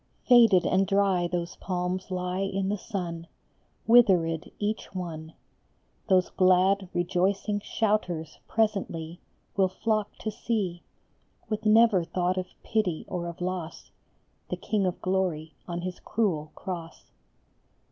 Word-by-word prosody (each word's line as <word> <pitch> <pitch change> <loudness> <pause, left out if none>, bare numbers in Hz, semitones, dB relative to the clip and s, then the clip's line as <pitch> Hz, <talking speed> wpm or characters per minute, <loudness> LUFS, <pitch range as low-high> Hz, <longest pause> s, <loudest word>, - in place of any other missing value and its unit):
Faded 230 -7 +7
and 190 +1 +2
dry 195 -3 +2
those 175 0 -3
palms 180 0 -3
lie 180 0 -2
in 195 0 -1
the 205 - 0
sun, 170 -5 -5 0.6
Withered 180 -9 +4
each 210 -1 -3
one; 160 -3 -6 0.7
Those 185 -1 +3
glad, 185 +1 +3
rejoicing 190 +4 0
shouters 200 -7 -1
presently 185 -6 -1 0.4
Will 195 -2 +4
flock 215 +2 -1
to 215 - -2
see, 200 -6 -2 0.7
With 215 0 -2
never 215 -4 +5
thought 180 +2 -1
of 185 - -4 0.2
pity 200 -8 -1
or 175 -1 -3
of 170 0 -8
loss, 180 -2 -4 0.6
The - - -2
King 205 -3 0
of 180 - -3
Glory 180 -4 -1
on 175 -1 -3
his 180 0 -5
cruel 175 -9 -1
cross. 170 -3 -7
185 Hz, 125 wpm, -27 LUFS, 175-205 Hz, 0.7 s, Faded